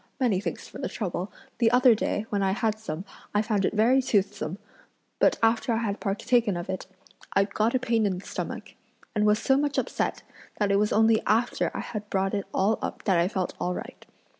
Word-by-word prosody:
many 235 Hz, -8 st, +2 dB
thanks 175 Hz, -5 st, -5 dB
for -, -, -10 dB
the -, -, -3 dB
trouble; 185 Hz, -2 st, -3 dB, 0.3 s
the 230 Hz, -2 st, +5 dB
other 250 Hz, +1 st, +6 dB
day, 215 Hz, 0 st, -1 dB
when 205 Hz, -1 st, 0 dB
I 190 Hz, -1 st, +2 dB
had 215 Hz, +1 st, -1 dB
some, 180 Hz, -4 st, -5 dB, 0.3 s
I 210 Hz, -, +3 dB
found 210 Hz, -3 st, +1 dB
it -, -, -1 dB
very 240 Hz, +5 st, +4 dB
toothsome, 200 Hz, -7 st, 0 dB, 0.6 s
but -, -, +4 dB
after 230 Hz, +2 st, +3 dB
I -, -, +1 dB
had 205 Hz, -1 st, -2 dB
partaken 210 Hz, 0 st, +1 dB
of 175 Hz, +2 st, -4 dB
it, 185 Hz, -, -5 dB, 0.5 s
I 195 Hz, -, +4 dB
got 215 Hz, +4 st, 0 dB
a -, -, +3 dB
pain 230 Hz, -4 st, +1 dB
in 185 Hz, -2 st, -1 dB
the 185 Hz, -, -10 dB
stomach, -, -, -5 dB, 0.4 s
and 210 Hz, -1 st, +2 dB
was 210 Hz, 0 st, +4 dB
so 265 Hz, +4 st, +2 dB
much 290 Hz, 0 st, 0 dB
upset, -, -, -1 dB, 0.3 s
that 205 Hz, -1 st, +1 dB
it 200 Hz, -, +4 dB
was 210 Hz, 0 st, +1 dB
only 220 Hz, 0 st, +4 dB
after 230 Hz, +4 st, +2 dB
I -, -, -2 dB
had 210 Hz, -2 st, -6 dB
brought 195 Hz, 0 st, 0 dB
it 200 Hz, -1 st, -2 dB
all 205 Hz, +4 st, +1 dB
up -, -, -5 dB
that 190 Hz, -4 st, +3 dB
I 170 Hz, -, +3 dB
felt 190 Hz, -2 st, -2 dB
all 180 Hz, 0 st, -1 dB
right. -, -, -8 dB
210 Hz, 215 wpm, -27 LUFS, 195-225 Hz, 0.6 s, other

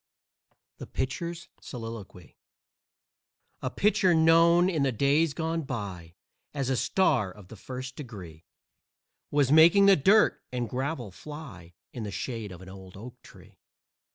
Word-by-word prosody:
THE -, -, -8 dB
PITCHER'S 170 Hz, +6 st, -4 dB
SOLILOQUY 115 Hz, -, -9 dB, 1.3 s
A -, -, -2 dB
pitcher 195 Hz, -4 st, +2 dB
known 165 Hz, +2 st, +5 dB
in 165 Hz, -6 st, 0 dB
the 135 Hz, -1 st, +2 dB
days 140 Hz, +5 st, +1 dB
gone 165 Hz, +1 st, -2 dB
by 100 Hz, -, -6 dB, 0.4 s
As 135 Hz, -2 st, -1 dB
a -, -, +1 dB
star 125 Hz, -, +1 dB
of 95 Hz, 0 st, -15 dB
the -, -, -10 dB
first 130 Hz, +4 st, -8 dB
degree 90 Hz, -, -10 dB, 0.9 s
Was 145 Hz, -2 st, +2 dB
making 170 Hz, +6 st, +7 dB
the 200 Hz, -1 st, +7 dB
dirt 200 Hz, +8 st, +3 dB
and 125 Hz, -2 st, -2 dB
gravel 130 Hz, -3 st, -4 dB
fly 95 Hz, -, -11 dB, 0.2 s
In 120 Hz, -, -6 dB
the 105 Hz, -, -4 dB
shade 105 Hz, +2 st, -5 dB
of 90 Hz, 0 st, -11 dB
an -, -, -13 dB
old 95 Hz, -1 st, -12 dB
oak 120 Hz, +4 st, -11 dB
tree. -, -, -18 dB
130 Hz, 140 wpm, -27 LUFS, 100-160 Hz, 1.3 s, making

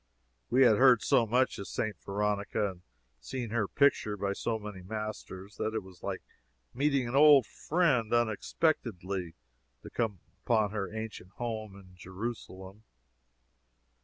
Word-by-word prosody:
We 130 Hz, +3 st, +5 dB
had 110 Hz, -4 st, +6 dB
heard 125 Hz, -4 st, +6 dB
so 115 Hz, -, +3 dB
much 125 Hz, +4 st, +1 dB
of 100 Hz, -, -6 dB
St. 110 Hz, -2 st, -2 dB
Veronica, 100 Hz, 0 st, -1 dB
and 90 Hz, -1 st, -15 dB, 0.4 s
seen 115 Hz, -, -5 dB
her 110 Hz, -3 st, 0 dB
picture 110 Hz, -6 st, +2 dB
by 100 Hz, 0 st, -1 dB
so 115 Hz, +3 st, -2 dB
many 105 Hz, -3 st, -8 dB
masters, 105 Hz, -1 st, -6 dB
that 110 Hz, +1 st, -2 dB
it 110 Hz, -, -2 dB
was 95 Hz, -1 st, -15 dB
like 95 Hz, -2 st, -4 dB, 0.5 s
meeting 140 Hz, -1 st, +1 dB
an 120 Hz, -, -3 dB
old 145 Hz, -3 st, +8 dB
friend 145 Hz, -10 st, +1 dB
unexpectedly 105 Hz, -, 0 dB, 0.5 s
to -, -, -8 dB
come 110 Hz, -5 st, -1 dB, 0.3 s
upon 110 Hz, -4 st, +2 dB
her 100 Hz, -3 st, -3 dB
ancient 110 Hz, -4 st, -6 dB
home 110 Hz, -3 st, -5 dB
in 95 Hz, -2 st, -15 dB
Jerusalem. 95 Hz, 0 st, -7 dB
110 Hz, 140 wpm, -30 LUFS, 100-120 Hz, 0.5 s, old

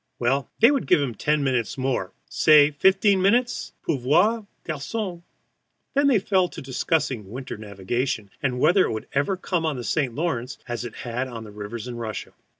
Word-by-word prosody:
Well, 130 Hz, +3 st, 0 dB
they 230 Hz, +4 st, +8 dB
would 275 Hz, -3 st, -1 dB
give -, -, +5 dB
him 135 Hz, -4 st, -1 dB
ten 150 Hz, +6 st, 0 dB
minutes 125 Hz, -5 st, 0 dB
more, 130 Hz, -8 st, -1 dB, 0.2 s
say 150 Hz, -1 st, +6 dB
fifteen 190 Hz, +5 st, +3 dB
minutes, 240 Hz, +6 st, +1 dB
pauvre 175 Hz, -, +2 dB, 0.2 s
garçon. 175 Hz, +4 st, -4 dB, 0.7 s
Then 280 Hz, +1 st, +3 dB
they 265 Hz, -5 st, +5 dB
fell 190 Hz, -2 st, +2 dB
to -, -, -9 dB
discussing 135 Hz, -, -1 dB
winter 130 Hz, +4 st, -6 dB
navigation, 105 Hz, +2 st, -3 dB
and 125 Hz, -3 st, -1 dB
whether 185 Hz, +7 st, +5 dB
it -, -, -2 dB
would 110 Hz, -, -5 dB
ever 145 Hz, +8 st, +1 dB
come 180 Hz, -2 st, -1 dB
on 155 Hz, -3 st, 0 dB
the 120 Hz, -, -5 dB
St. 130 Hz, -1 st, -1 dB
Lawrence 135 Hz, -5 st, -2 dB
as 120 Hz, 0 st, -3 dB
it 120 Hz, -3 st, -7 dB
had 125 Hz, +2 st, -2 dB
on 115 Hz, -3 st, -7 dB
rivers 105 Hz, +3 st, -6 dB
in 120 Hz, -1 st, -6 dB
Russia. 110 Hz, -2 st, -5 dB
140 Hz, 175 wpm, -24 LUFS, 120-180 Hz, 0.7 s, they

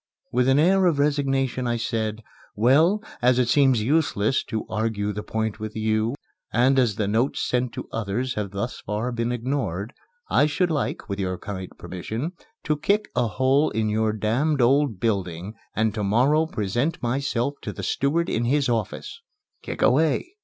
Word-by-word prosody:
With 125 Hz, +1 st, +2 dB
an 135 Hz, +1 st, +4 dB
air 185 Hz, +4 st, +4 dB
of 165 Hz, -4 st, +2 dB
resignation 135 Hz, -3 st, +1 dB
I 120 Hz, 0 st, 0 dB
said, 110 Hz, -1 st, -2 dB, 0.3 s
"Well, 155 Hz, -, +4 dB, 0.2 s
as 125 Hz, 0 st, +4 dB
it 125 Hz, -2 st, +2 dB
seems 130 Hz, -3 st, +4 dB
useless 135 Hz, -4 st, +1 dB
to 110 Hz, -2 st, -3 dB
argue 110 Hz, -2 st, -1 dB
the 105 Hz, -, -4 dB
point 110 Hz, 0 st, -3 dB
with 110 Hz, 0 st, -6 dB
you 110 Hz, +2 st, 0 dB, 0.4 s
and 130 Hz, +3 st, +3 dB
as 120 Hz, -5 st, +2 dB
the 105 Hz, -2 st, -1 dB
notes 115 Hz, +6 st, 0 dB
sent 125 Hz, -1 st, 0 dB
to -, -, -6 dB
others 115 Hz, +4 st, -2 dB
have 105 Hz, -4 st, -3 dB
thus 100 Hz, +5 st, -4 dB
far 105 Hz, +5 st, -3 dB
been 120 Hz, 0 st, -1 dB
ignored, 120 Hz, -4 st, -2 dB, 0.3 s
I 145 Hz, -, +3 dB
should 170 Hz, +3 st, 0 dB
like, 150 Hz, -3 st, -2 dB
with 100 Hz, -1 st, -4 dB
your 90 Hz, -1 st, -1 dB
kind 95 Hz, -2 st, -6 dB
permission, 100 Hz, -, -5 dB, 0.3 s
to 150 Hz, -1 st, 0 dB
kick 205 Hz, +6 st, +1 dB
a 120 Hz, -, +2 dB
hole 130 Hz, +6 st, +2 dB
in 110 Hz, 0 st, -1 dB
your 110 Hz, +1 st, +1 dB
damned 120 Hz, +8 st, 0 dB
old 130 Hz, -3 st, +3 dB
building 95 Hz, -3 st, -2 dB, 0.2 s
and 110 Hz, -1 st, +1 dB
to 105 Hz, -1 st, -2 dB
morrow 135 Hz, +10 st, +3 dB
present 120 Hz, +6 st, -2 dB
myself 130 Hz, +1 st, 0 dB
to -, -, -4 dB
the -, -, -8 dB
steward 165 Hz, +5 st, +1 dB
in 115 Hz, -, 0 dB
his 140 Hz, +2 st, +2 dB
office." 115 Hz, -4 st, -3 dB, 0.4 s
"Kick -, -, -4 dB
away!" 160 Hz, -, +2 dB
120 Hz, 175 wpm, -24 LUFS, 110-140 Hz, 0.4 s, an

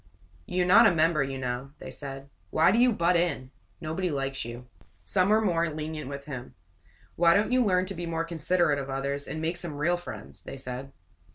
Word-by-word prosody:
"You're 180 Hz, 0 st, +1 dB
not 180 Hz, +3 st, +7 dB
a 175 Hz, -, +3 dB
member, 160 Hz, -1 st, +3 dB
you 135 Hz, 0 st, -2 dB
know," 130 Hz, +2 st, -4 dB
they -, -, -9 dB
said. 135 Hz, -1 st, -8 dB, 0.2 s
"Why 160 Hz, +3 st, +4 dB
do 225 Hz, -, +3 dB
you 250 Hz, 0 st, +5 dB
butt 175 Hz, -4 st, +2 dB
in? 155 Hz, -7 st, 0 dB, 0.3 s
Nobody 165 Hz, +4 st, -2 dB
likes 135 Hz, -2 st, -2 dB
you." 120 Hz, +1 st, -8 dB, 0.4 s
Some 185 Hz, 0 st, +2 dB
were 215 Hz, +1 st, +5 dB
more 170 Hz, -5 st, +1 dB
lenient 155 Hz, -2 st, -5 dB
with 140 Hz, 0 st, -7 dB
him. 130 Hz, -4 st, -7 dB, 0.6 s
"Why 170 Hz, +1 st, +5 dB
don't 210 Hz, +4 st, +2 dB
you 255 Hz, 0 st, +4 dB
learn 185 Hz, -3 st, +2 dB
to 195 Hz, -, -5 dB
be 175 Hz, -1 st, -5 dB
more 165 Hz, 0 st, -1 dB
considerate 165 Hz, -2 st, +1 dB
of 135 Hz, 0 st, -5 dB
others, 140 Hz, +1 st, -2 dB
and 155 Hz, -, -4 dB
make 165 Hz, +2 st, -1 dB
some 170 Hz, -4 st, -4 dB
real 170 Hz, +4 st, +2 dB
friends?" 175 Hz, -, -9 dB
they -, -, -8 dB
said. 130 Hz, +1 st, -6 dB
160 Hz, 205 wpm, -28 LUFS, 135-175 Hz, 0.6 s, not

